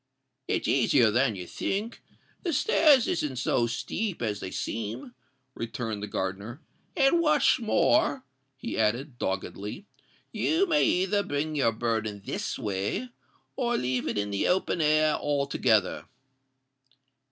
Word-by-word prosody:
"It's -, -, -1 dB
easier 120 Hz, -3 st, +4 dB
than 120 Hz, -1 st, +2 dB
you 90 Hz, -2 st, -6 dB
think—the 230 Hz, -, -5 dB
stairs 290 Hz, -, +4 dB
isn't 150 Hz, -5 st, -1 dB
so 120 Hz, -1 st, +1 dB
steep 185 Hz, -, -3 dB
as 105 Hz, -3 st, -2 dB
they 95 Hz, -, -5 dB
seem," 115 Hz, -, -5 dB, 0.4 s
returned 115 Hz, -3 st, -4 dB
the 105 Hz, -, -4 dB
gardener; 100 Hz, +6 st, -4 dB, 0.4 s
"and 275 Hz, +4 st, +4 dB
what's 305 Hz, -5 st, +3 dB
more," 265 Hz, +4 st, +2 dB, 0.3 s
he 135 Hz, -, -4 dB
added, 120 Hz, +4 st, 0 dB
doggedly, 100 Hz, -, -4 dB, 0.5 s
"you 340 Hz, +5 st, +1 dB
may 315 Hz, -5 st, +2 dB
either 195 Hz, +3 st, +2 dB
bring 150 Hz, -3 st, -2 dB
your 130 Hz, -6 st, +2 dB
burden 110 Hz, -3 st, -2 dB
this -, -, -3 dB
way, 105 Hz, -, -2 dB, 0.5 s
or 240 Hz, -2 st, 0 dB
leave 125 Hz, 0 st, -1 dB
it -, -, -2 dB
in 105 Hz, 0 st, -1 dB
the 100 Hz, -, 0 dB
open 180 Hz, -2 st, +1 dB
air 155 Hz, 0 st, +3 dB
altogether." 140 Hz, -8 st, +1 dB
130 Hz, 130 wpm, -27 LUFS, -, 0.5 s, easier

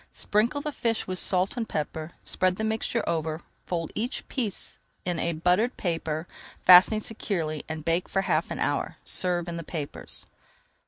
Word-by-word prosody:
Sprinkle 235 Hz, +8 st, +1 dB
the 300 Hz, -, -3 dB
fish 230 Hz, -5 st, -1 dB
with 185 Hz, -1 st, -2 dB
salt 185 Hz, +1 st, +3 dB
and 230 Hz, -3 st, -3 dB
pepper, 155 Hz, +2 st, -3 dB
spread 185 Hz, 0 st, +2 dB
the 220 Hz, -, -3 dB
mixture 220 Hz, +1 st, -1 dB
over, 160 Hz, 0 st, -1 dB, 0.3 s
fold 165 Hz, -3 st, -2 dB
each 240 Hz, +5 st, -2 dB
piece 225 Hz, -8 st, -3 dB, 0.3 s
in 170 Hz, -2 st, -1 dB
buttered 190 Hz, +8 st, +3 dB
paper, 165 Hz, -2 st, -2 dB, 0.4 s
fastening 185 Hz, +4 st, +9 dB
securely, 170 Hz, -9 st, -3 dB
and 160 Hz, -1 st, -5 dB
bake 170 Hz, +2 st, +1 dB
for 195 Hz, -, +1 dB
half 195 Hz, -, +1 dB
an -, -, -4 dB
hour. -, -, -1 dB
Serve 175 Hz, -2 st, +1 dB
in 170 Hz, -1 st, -4 dB
the 165 Hz, -, -5 dB
papers. 150 Hz, -3 st, -4 dB
180 Hz, 160 wpm, -27 LUFS, 165-215 Hz, 0.4 s, fastening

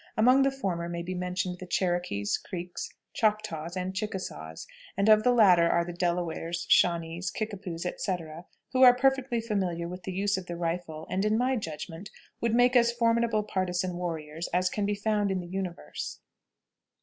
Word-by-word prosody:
Among 250 Hz, +5 st, +6 dB
the 275 Hz, -, +4 dB
former 185 Hz, -11 st, -3 dB
may 170 Hz, 0 st, -4 dB
be 185 Hz, +2 st, -4 dB
mentioned 180 Hz, 0 st, -2 dB
the 185 Hz, -, -8 dB
Cherokees, 175 Hz, -, 0 dB
Creeks, 180 Hz, -1 st, -6 dB, 0.2 s
Choctaws, 200 Hz, -6 st, -1 dB
and 185 Hz, +1 st, -2 dB
Chickasaws, 185 Hz, -, -5 dB, 0.3 s
and 200 Hz, +1 st, +2 dB
of 215 Hz, -1 st, +7 dB
the 250 Hz, -, +4 dB
latter 185 Hz, -8 st, +6 dB
are 170 Hz, 0 st, +2 dB
the 175 Hz, -, -6 dB
Delawares, 170 Hz, -1 st, -2 dB
Shawnees, 170 Hz, +1 st, +3 dB
Kickapoos, 190 Hz, -5 st, -5 dB
etc., 175 Hz, -3 st, -4 dB, 0.3 s
who 260 Hz, -, +2 dB
are 250 Hz, -1 st, +9 dB
perfectly 265 Hz, -2 st, +2 dB
familiar 190 Hz, -7 st, -1 dB
with 180 Hz, +1 st, -7 dB
the 190 Hz, -, -5 dB
use 195 Hz, +1 st, 0 dB
of 185 Hz, -1 st, -6 dB
the 175 Hz, -, -4 dB
rifle, 165 Hz, -2 st, -3 dB
and, 190 Hz, +1 st, 0 dB
in 215 Hz, +1 st, +2 dB
my 255 Hz, +2 st, +2 dB
judgment, 165 Hz, -1 st, -6 dB, 0.3 s
would 230 Hz, -1 st, +1 dB
make 245 Hz, +1 st, +4 dB
as 235 Hz, -1 st, +5 dB
formidable 230 Hz, -2 st, +2 dB
partisan 185 Hz, -2 st, -1 dB
warriors 165 Hz, -2 st, -4 dB
as 180 Hz, +1 st, +1 dB
can 205 Hz, -1 st, -1 dB
be 205 Hz, -, 0 dB
found 210 Hz, 0 st, 0 dB
in 190 Hz, -1 st, 0 dB
the 175 Hz, -, -6 dB
universe. 180 Hz, -, -5 dB
185 Hz, 175 wpm, -28 LUFS, 170-215 Hz, 0.3 s, are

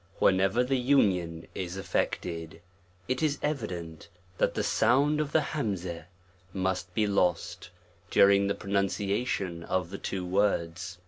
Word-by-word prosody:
* -, -, -29 dB
Whenever 95 Hz, +5 st, +3 dB
the 130 Hz, +1 st, 0 dB
union 95 Hz, -11 st, +2 dB
is 90 Hz, 0 st, -4 dB
effected, 85 Hz, -3 st, -3 dB, 0.5 s
it 130 Hz, 0 st, -1 dB
is 150 Hz, -2 st, +1 dB
evident 90 Hz, -, -4 dB, 0.3 s
that -, -, +2 dB
the -, -, 0 dB
sound 145 Hz, +6 st, +3 dB
of 150 Hz, -1 st, -3 dB
the 160 Hz, -, +4 dB
humzqh 95 Hz, -, -3 dB, 0.5 s
must 95 Hz, -1 st, -2 dB
be 110 Hz, -, +2 dB
lost, 90 Hz, -3 st, 0 dB, 0.4 s
during 100 Hz, 0 st, +5 dB
the 100 Hz, -, 0 dB
pronunciation 100 Hz, -2 st, -1 dB
of 90 Hz, 0 st, -2 dB
the 100 Hz, -, -6 dB
two 95 Hz, -2 st, -3 dB
words. 90 Hz, -2 st, 0 dB
95 Hz, 135 wpm, -29 LUFS, 90-115 Hz, 0.5 s, during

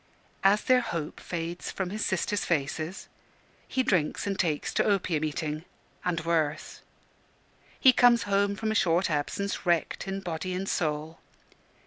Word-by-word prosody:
As 200 Hz, +2 st, +4 dB
their 255 Hz, -1 st, +4 dB
hope 170 Hz, -10 st, -4 dB
fades 170 Hz, 0 st, -4 dB
from 185 Hz, -2 st, -3 dB
his 215 Hz, +1 st, -2 dB
sisters' 200 Hz, +2 st, 0 dB
faces, 160 Hz, +3 st, -2 dB, 0.6 s
he 260 Hz, -, 0 dB
drinks 180 Hz, -10 st, +1 dB
and 200 Hz, -1 st, -2 dB
takes 155 Hz, -5 st, 0 dB
to -, -, +3 dB
opium 185 Hz, -6 st, +1 dB
eating 155 Hz, 0 st, -2 dB, 0.4 s
and 180 Hz, -2 st, 0 dB
worse. 155 Hz, -3 st, -1 dB, 1.0 s
He 260 Hz, -, +7 dB
comes 240 Hz, -1 st, +5 dB
home 200 Hz, 0 st, +1 dB
from 220 Hz, +2 st, -2 dB
a -, -, +1 dB
short 175 Hz, -3 st, +2 dB
absence, 155 Hz, +7 st, -2 dB
wrecked 175 Hz, +1 st, 0 dB
in 195 Hz, 0 st, -3 dB
body 180 Hz, 0 st, -3 dB
and 190 Hz, +1 st, -3 dB
soul. 155 Hz, -1 st, -2 dB
180 Hz, 145 wpm, -28 LUFS, 160-200 Hz, 1.0 s, He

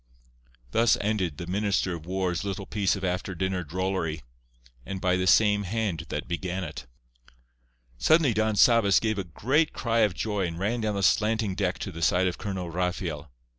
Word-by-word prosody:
Thus 115 Hz, -, +4 dB
ended 100 Hz, -7 st, -1 dB
the 85 Hz, -, -5 dB
Minister 100 Hz, 0 st, 0 dB
of 85 Hz, -1 st, -8 dB
War's 95 Hz, -1 st, -1 dB
little 100 Hz, 0 st, -4 dB
piece 100 Hz, -1 st, 0 dB
of 95 Hz, -, -7 dB
after 90 Hz, 0 st, -2 dB
dinner 95 Hz, +1 st, -1 dB
drollery, 80 Hz, -2 st, -2 dB, 0.6 s
and 95 Hz, +6 st, -5 dB
by 90 Hz, 0 st, +2 dB
the 90 Hz, 0 st, 0 dB
same 105 Hz, +1 st, +5 dB
hand 100 Hz, -5 st, -2 dB
that 75 Hz, -, -4 dB
began 90 Hz, +2 st, -3 dB
it. 80 Hz, -6 st, -7 dB, 1.1 s
Suddenly 155 Hz, -, +4 dB
Don 110 Hz, 0 st, +1 dB
Sabas 110 Hz, -2 st, +5 dB
gave 110 Hz, -2 st, -1 dB
a -, -, -1 dB
great 135 Hz, -, 0 dB
cry 115 Hz, -1 st, 0 dB
of 105 Hz, -5 st, +3 dB
joy, 105 Hz, -3 st, -1 dB
and 85 Hz, -1 st, -6 dB
ran 110 Hz, +6 st, -1 dB
down 105 Hz, -1 st, -1 dB
the 100 Hz, -, -2 dB
slanting 110 Hz, +2 st, +2 dB
deck 95 Hz, -1 st, -1 dB
to 95 Hz, -, -5 dB
the 85 Hz, -1 st, -8 dB
side 90 Hz, +2 st, +3 dB
of 90 Hz, -, -2 dB
Colonel 95 Hz, -4 st, -4 dB
Rafael. 85 Hz, -4 st, -3 dB
95 Hz, 180 wpm, -27 LUFS, 90-105 Hz, 1.1 s, same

